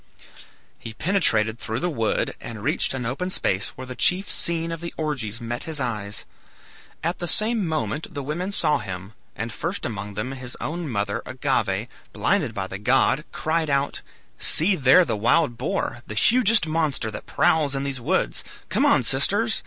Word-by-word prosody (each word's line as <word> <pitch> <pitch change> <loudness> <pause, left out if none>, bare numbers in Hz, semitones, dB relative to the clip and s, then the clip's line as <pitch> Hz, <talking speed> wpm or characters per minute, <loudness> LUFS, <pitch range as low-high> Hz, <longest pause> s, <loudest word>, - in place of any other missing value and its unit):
He 115 - -8
penetrated 115 - +1
through 110 0 -3
the 175 - -1
wood 115 -6 0
and 110 -3 -7
reached - - +1
an 125 -2 -3
open 140 +10 -2
space 95 - 0
where 130 - -7
the 125 0 -7
chief 185 +9 +2
scene 165 -1 -1
of 165 0 -5
the 170 - -6
orgies 130 -9 -2
met 120 +1 -5
his 160 -2 -2
eyes. 105 -5 -3 0.8
At 170 +2 -1
the 175 - -3
same 215 0 +5
moment 150 -2 -2
the 140 - -3
women 175 +7 -3
saw 160 -6 +4
him; 95 0 -7 0.2
and 115 +1 -4
first 175 +4 -3
among 105 -3 -5
them 105 +6 -3
his 130 -2 -5
own 170 0 -4
mother, 100 -3 -1
Agave, 120 -6 0 0.3
blinded 155 - 0
by 95 - -2
the 95 0 -7
god, 135 +6 +3
cried 160 0 -1
out, 140 0 0 0.4
"See 185 +5 +2
there 140 +4 +6
the - - -1
wild 120 +5 +2
boar, 120 - -2
the 105 - -6
hugest 225 - +5
monster 155 -8 -1
that - - -8
prowls 150 -4 +2
in 135 - -2
these 135 -3 -3
woods! - - 0 0.3
Come - - +3
on, 125 - +4
sisters! 200 - +2
135 Hz, 175 wpm, -24 LUFS, 110-165 Hz, 0.8 s, there